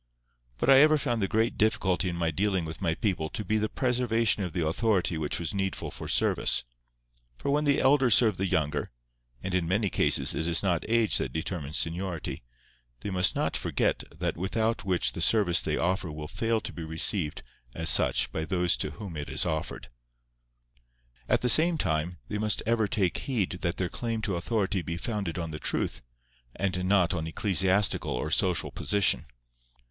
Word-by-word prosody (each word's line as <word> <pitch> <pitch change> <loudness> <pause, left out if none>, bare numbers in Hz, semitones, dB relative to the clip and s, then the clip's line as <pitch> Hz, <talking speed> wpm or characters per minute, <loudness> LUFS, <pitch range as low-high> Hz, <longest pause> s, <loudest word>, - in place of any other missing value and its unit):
But - - -2
I 135 -1 +8
ever 155 +2 +6
found 120 -5 -1
the 95 - +1
great 110 +4 0
difficulty 100 -4 +1
in 85 - -4
my 85 -1 -1
dealing 95 +1 0
with 80 +1 -7
my 80 - 0
people 90 -8 -2
to 105 - -5
be 110 0 0
the 110 0 -1
preservation 120 -4 +1
of 90 -3 -3
the 85 0 -2
authority 95 0 0
which 80 -2 -2
was 85 +3 -3
needful 95 -1 -3
for - - -8
service; - - +2 0.7
for 140 - -2
when 150 +1 +1
the 140 -1 +3
elder 135 -1 +4
serve 110 -4 +5
the 95 - -1
younger—and - - -4
in 90 -3 0
many 100 +2 0
cases - - +3
it 80 - -2
is 85 +2 +2
not 90 0 -1
age 115 -2 +3
that - - -3
determines 80 -2 -3
seniority—they 65 -6 -5
must 90 -1 +3
not - - -1
forget - - -1
that - - -2
without 110 +5 -1
which 95 -3 +1
the - - -5
service 95 -2 +3
they - - -2
offer 90 -1 -1
will 75 0 -7
fail 115 +6 -1
to - - -6
be 85 - -7
received 80 0 0 0.3
as 80 0 -3
such - - +2
by 80 - -3
those 90 0 +1
to - - -2
whom 85 +3 -9
it 75 -1 -6
is - - -1
offered. 80 -5 -4 1.4
At - - +2
the 125 - 0
same 165 +6 +8
time 85 - -1
they 105 - -4
must 105 -1 -1
ever 115 -1 +1
take 100 -6 0
heed 100 -9 -2
that 85 0 -2
their 90 - -1
claim 115 +2 -4
to 100 -4 -1
authority 100 +1 -1
be 85 +1 -5
founded 100 -5 -3
on 85 -2 -4
the 75 - -6
truth, - - -2 0.5
and 95 -2 -2
not 95 -2 +2
on 80 -2 -3
ecclesiastical 95 +3 +1
or 75 +5 -3
social 90 -1 +1
position. 100 -6 +1
95 Hz, 185 wpm, -28 LUFS, 80-110 Hz, 1.4 s, I